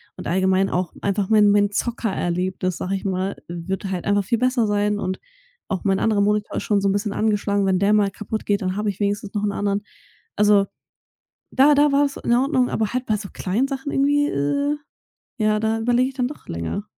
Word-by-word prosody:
Und - - -7
allgemein 190 +2 +2
auch 180 0 -2
einfach 200 -1 0
mein 210 -2 +5
mein 205 0 +3
Zocker-Erlebnis, 185 -5 -2
sage 190 +2 -2
ich 190 - -5
mal, 190 0 -2
wird 175 +4 -4
halt 180 -2 -3
einfach 205 0 +2
viel 230 +4 0
besser 250 -2 +1
sein. 205 0 0
Und 185 -1 -3 0.5
auch 195 -3 -3
mein 195 -1 +1
anderer 215 -2 +2
Monitor 210 0 0
ist - - -2
schon 205 -2 +1
so 200 - 0
'n 195 - +2
bisschen 205 0 -1
angeschlagen. 205 -2 +1
Wenn 190 -1 +2
der 200 +1 +3
mal 205 -2 +3
kaputt 215 +2 -5
geht, 205 -1 +1
dann 185 +1 -2
habe 210 0 0
ich 200 0 -6
wenigstens 205 0 -1
noch 205 0 -2
'n 205 - +1
anderen. 200 0 -1 0.5
Also, 205 -1 +4 0.9
da 285 +3 +5
da 290 +1 +4
war 285 +1 +4
es 275 - -3
in - - -1
Ordnung. 255 0 +2
Aber 220 0 -1
halt 255 0 -2
bei 215 - +1
so 200 -2 -8
kleinen 210 +8 -1
Sachen 275 0 -4
irgendwie, 290 +1 +2
äh, 280 - 0 0.6
ja, 215 -1 +2
da 220 +1 0
überlege 245 +3 +2
ich - - -16
dann 250 -2 0
doch 295 - -11
länger. 85 - -4
205 Hz, 215 wpm, -22 LUFS, 195-230 Hz, 0.9 s, mein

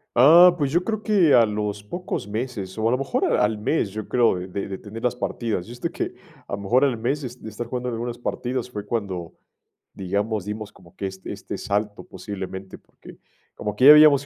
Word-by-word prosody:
Ah, 170 +8 +8
pues 140 -4 0
yo 175 +3 +2
creo 220 0 -3
que 190 -9 +4
a 115 - +7
los 105 -1 -3
pocos 175 - -5
meses, 105 -3 -4
o 110 +1 +1
a - - +2
lo 125 - +2
mejor 135 +1 -1
a - - +2
al 105 +1 +1
mes, 110 0 0
yo 110 +1 -6
creo, 120 -6 +3
de 90 - -6
de 100 +1 -4
de 95 -1 -5
tener 110 +3 -9
las 125 -1 +1
partidas. 115 -6 -3
Yo, 120 - -8
este, 120 - -4
que - - -3 0.3
a - - -8
lo 100 - -2
mejor, 125 +7 +3
al 125 -4 0
mes 130 +7 -1
de 135 - -4
s 125 +1 -12
de 110 - -7
estar 115 +3 -6
jugando 125 +1 -3
algunas 120 0 -4
partidas, 125 +1 -3
fue 105 -4 -6
cuando, 95 -7 -3 0.6
digamos, 100 +2 -2
dimos 105 0 -5
como 85 - -20
que 100 - -3
este 95 0 -8
este - - -7
salto 105 +1 -2
posiblemente, 95 0 -7
porque - - -16 0.4
como 105 0 -4
que 125 - +3
ya 145 - +12
habíamos 150 -2 +7
110 Hz, 225 wpm, -23 LUFS, 100-125 Hz, 0.6 s, ya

